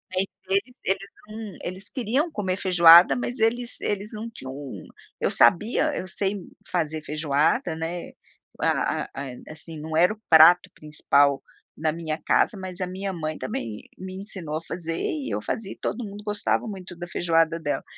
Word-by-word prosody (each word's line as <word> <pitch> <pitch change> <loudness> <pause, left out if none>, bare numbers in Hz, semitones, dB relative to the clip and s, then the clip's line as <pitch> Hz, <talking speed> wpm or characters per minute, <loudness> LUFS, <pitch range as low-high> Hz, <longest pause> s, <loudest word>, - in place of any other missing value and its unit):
Mas 185 +1 +2 0.2
eles 195 +1 +3 0.2
eles 195 +1 -1 0.2
não 215 -1 -8
eles 185 +3 -5
queriam 265 +6 0
comer 190 -7 -2
feijoada, 175 -2 +8
mas 245 0 -3
eles 240 +2 0
eles 205 +1 -2
não 220 +2 -5
tinham, 130 -12 -8 0.7
eu - - +1
sabia 215 - +3
eu 185 - -4
sei 195 +2 -1 0.3
fazer 160 -3 -1
feijoada, 155 - +1
né, 165 +2 -5 0.5
a - - +1
a - - -15
a, 140 - -5
eh, 125 - -11
assim, 155 0 -5
não 155 +1 -3
era 180 +5 +5
o 215 - -19
prato 175 +3 +8
principal 145 -2 +2 0.4
na 155 0 +1
minha 155 -1 -3
casa, 185 +6 +2
mas 185 0 -7
a 185 - -1
minha 190 +2 -4
mãe 155 -3 -4
também 115 -4 -5
me 185 0 -7
ensinou 190 -6 -4
a - - -5
fazer 165 -1 -4
e 295 -4 -2
eu - - -1
fazia 205 -4 -3
e - - -19
todo 245 - -3
mundo 205 -1 -8
gostava 210 +2 0
muito 185 -4 -7
da 175 - -6
feijoada 165 -1 +1
dela. 145 -3 -2
180 Hz, 175 wpm, -25 LUFS, 160-205 Hz, 0.7 s, feijoada